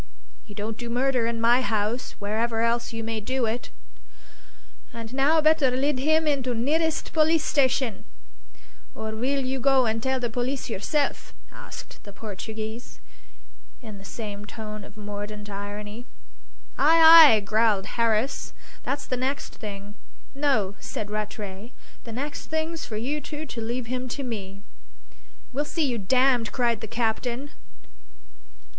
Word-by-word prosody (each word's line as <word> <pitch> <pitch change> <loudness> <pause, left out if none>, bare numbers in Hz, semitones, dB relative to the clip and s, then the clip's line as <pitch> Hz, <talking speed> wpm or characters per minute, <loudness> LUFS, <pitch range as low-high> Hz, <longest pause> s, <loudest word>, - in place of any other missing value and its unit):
You 205 - -11
don't 215 +2 -4
do 240 -1 -5
murder 250 -1 +1
in 230 -1 -2
my 240 +3 +5
house, 220 0 -1
wherever 225 +3 -1
else 235 +1 +1
you 225 -1 -4
may 225 0 -2
do 255 +3 0
it." 225 +2 -3 1.2
"And 230 0 -8
now 285 +4 +4
better 310 -3 +4
lid 265 +2 0
'im 315 +3 +3 0.2
to 250 -1 -2
the - - -2
nirrest 320 +5 0
polissstation; 285 -7 +2 0.9
or 220 0 -4
weel 260 +5 -1
you 265 +1 -1
go 265 -1 +4
and 225 0 0
tell 265 +1 0
the 245 - -1
poliss 245 +2 -2
yourself?" 280 +8 -1 0.2
asked - - -10
the 205 - -10
Portuguese, 220 +3 -7 0.8
in 215 -3 -8
the - - -12
same 205 -1 -6
tone 215 0 -7
of 205 +1 -14
mordant 205 0 -6
irony. 205 +3 -6 0.7
"Ay, 320 -2 +9
ay," - - +1
growled 210 -1 +2
Harris; 230 +4 0 0.3
"that's 285 +1 -3
the 255 - -2
next 265 +3 -2
thing!" 205 -1 -7 0.4
"No," 270 -9 +1
said 205 -1 -5
Rattray; 210 +1 -5 0.3
"the 230 - -7
next 285 +6 -5
thing's 315 +1 -2
for 215 - -5
you 280 +7 -2
two 305 +1 -6
to 245 -5 -6
leave 240 +2 -2
him 250 +1 -3
to 280 +4 -4
me." 200 -5 -6 0.9
"We'll 285 +3 0
see 315 +1 -1
you 245 -4 -1
damned!" 250 +3 +3
cried 235 -3 +1
the 220 - -5
captain. 240 +4 -1
235 Hz, 145 wpm, -26 LUFS, 215-270 Hz, 1.2 s, Ay